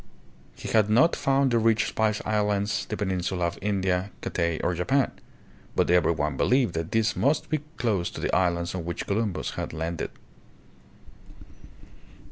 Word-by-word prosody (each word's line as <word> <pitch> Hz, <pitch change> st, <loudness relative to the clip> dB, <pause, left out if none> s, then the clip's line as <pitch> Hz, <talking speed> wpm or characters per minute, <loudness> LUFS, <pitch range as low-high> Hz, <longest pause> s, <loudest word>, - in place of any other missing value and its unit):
He -, -, -8 dB
had 110 Hz, -2 st, +3 dB
not 125 Hz, +10 st, +4 dB
found 135 Hz, -1 st, +2 dB
the 120 Hz, -, +3 dB
rich 115 Hz, 0 st, +3 dB
Spice 110 Hz, -1 st, 0 dB
Islands, 105 Hz, -1 st, 0 dB
the 105 Hz, -, -4 dB
peninsula 95 Hz, -2 st, -1 dB
of 85 Hz, -, -3 dB
India, 95 Hz, -2 st, 0 dB
Cathay 85 Hz, -2 st, -1 dB
or 90 Hz, -, +1 dB
Japan, 130 Hz, +11 st, +1 dB, 0.6 s
but -, -, +2 dB
every 90 Hz, -1 st, +4 dB
one 75 Hz, -3 st, -2 dB
be -, -, +1 dB
lieved 125 Hz, -7 st, +3 dB
that 80 Hz, 0 st, -3 dB
these 115 Hz, 0 st, +1 dB
must 145 Hz, +2 st, +1 dB
be 155 Hz, -, +2 dB, 0.2 s
close 105 Hz, -8 st, 0 dB
to -, -, -8 dB
the -, -, 0 dB
islands 85 Hz, -1 st, +1 dB
on 90 Hz, -2 st, -4 dB
which 85 Hz, 0 st, -4 dB
Columbus 105 Hz, -1 st, -1 dB
had -, -, -5 dB
landed. 80 Hz, +1 st, -3 dB
100 Hz, 160 wpm, -26 LUFS, 85-115 Hz, 0.6 s, not